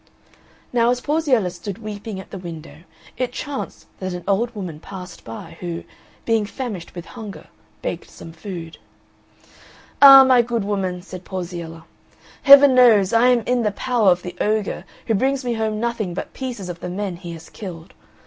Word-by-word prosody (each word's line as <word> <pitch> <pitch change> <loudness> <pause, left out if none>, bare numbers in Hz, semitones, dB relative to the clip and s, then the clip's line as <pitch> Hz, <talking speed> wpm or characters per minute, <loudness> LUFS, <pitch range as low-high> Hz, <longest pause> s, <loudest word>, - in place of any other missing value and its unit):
Now 235 -1 +3
as 245 0 +1
Porziella 270 - +1
stood 185 +2 -7
weeping 210 -2 -6
at 190 - -11
the 195 - -6
window 165 -3 -9 0.4
it 250 -1 -1
chanced 285 +2 -6
that 185 -1 -4
an 180 -1 -6
old 230 +4 +1
woman 180 -7 -6
passed 180 0 -10
by 160 +9 -9
who, 175 -1 -5 0.4
being 225 -3 +1
famished 210 -9 -6
with 175 0 -7
hunger, 220 -4 -10 0.3
begged - - -4
some 165 - -11
food. 165 -1 -8 1.2
"Ah, 275 -1 +11
my 255 -2 +5
good 235 -2 -2
woman," 190 -3 -2
said 185 -1 -9
Porziella, 170 -3 -6 0.6
"Heaven 280 -1 +9
knows 225 -6 +5
I 230 +2 +5
am 250 -2 +4
in 245 +2 0
the 215 - +2
power 235 -3 +2
of 180 0 +2
the 180 -1 -7
ogre 215 -1 -1 0.2
who 225 - +1
brings 265 +5 0
me 240 - 0
home 220 -1 -1
nothing 220 -6 -2
but - - -5
pieces 245 -8 -5
of 175 -1 -6
the 180 - -5
men 190 -1 -3
he 170 -1 -8
has 165 -1 -11
killed. 175 -5 -9
205 Hz, 175 wpm, -21 LUFS, 180-240 Hz, 1.2 s, Ah